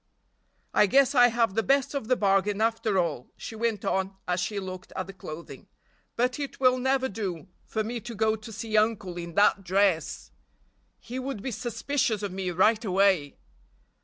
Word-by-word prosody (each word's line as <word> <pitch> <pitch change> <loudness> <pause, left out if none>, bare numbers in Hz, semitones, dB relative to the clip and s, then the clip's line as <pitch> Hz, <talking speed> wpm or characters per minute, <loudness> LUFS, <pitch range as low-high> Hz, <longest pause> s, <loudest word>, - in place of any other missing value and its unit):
"I 210 - +5
guess 275 +6 +4
I 245 -3 +7
have 230 -3 +1
the 225 - +2
best 275 +4 +2
of 275 -6 -3
the 255 - +3
bargain 200 -1 +2
after 225 -2 +1
all," 160 -8 -1
she - - -7
went 220 -2 -1
on 190 0 -1
as 180 0 0
she 200 +4 -2
looked 185 -1 -7
at 185 - -2
the 195 - -10
clothing, 170 -3 -9 0.5
"but 250 +3 0
it 285 -1 -5
will 255 -1 +4
never 265 +1 +1
do 190 - -5 0.2
for 220 - -1
me 235 +2 -4
to 235 +1 -8
go 220 +1 +2
to 220 +1 -10
see 220 0 -4
uncle 215 -4 +1
in 170 -1 -7
that 205 -1 +4
dress! 185 -3 +1 0.7
He 250 +2 -7
would 260 -5 -5
be 265 - -3
suspicious 240 0 -1
of 200 - -2
me 185 0 -3
right 210 +6 +3
away! 190 -7 +2
215 Hz, 185 wpm, -27 LUFS, 190-240 Hz, 0.7 s, I